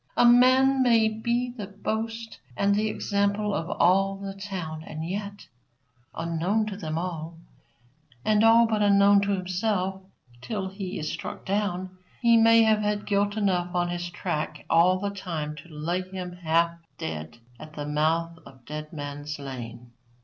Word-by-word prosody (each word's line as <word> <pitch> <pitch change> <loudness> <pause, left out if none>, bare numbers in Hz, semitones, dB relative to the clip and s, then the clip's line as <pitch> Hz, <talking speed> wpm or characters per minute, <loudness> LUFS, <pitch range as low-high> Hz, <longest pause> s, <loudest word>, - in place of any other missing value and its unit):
A - - +6
man 260 +2 +6
may 230 -3 +4
be 235 +3 -1
the 215 -5 -7
boast 225 +3 -4 0.2
and 200 0 +3
the 215 +2 +1
example 200 0 0
of 165 -1 -2
all 195 +2 +3
the 195 0 -6
town, 185 -6 -6
and 160 0 -6
yet, 200 +2 -5 0.7
unknown 170 +6 0
to 210 -2 -5
them 160 -5 -4
all, 165 -2 -4 0.9
and 215 0 +3
all 230 +1 +7
but 220 -2 0
unknown 200 0 +5
to 200 0 +1
himself 190 +1 -1 0.4
till 200 - -3
he 190 -1 -6
is 155 - -3
struck - - -6
down, 185 -2 -2 0.2
he 235 -1 +5
may 230 0 +6
have 220 -1 +4
had 210 0 -1
guilt 205 +1 0
enough 180 -4 0
on 175 0 +1
his 175 0 -3
track 155 -4 -4
all 175 +3 +5
the 200 +1 -3
time 165 -6 -4
to 160 +4 -12
lay 165 +4 -2
him 185 -1 -6
half 170 0 +1 0.2
dead 80 +2 -6 0.2
at 155 0 -11
the 145 -1 -5
mouth 160 +3 0
of 130 -3 -16
Dead 150 +2 -6
Man's 145 0 -6
lane. 125 -3 -8
190 Hz, 160 wpm, -26 LUFS, 165-210 Hz, 0.9 s, all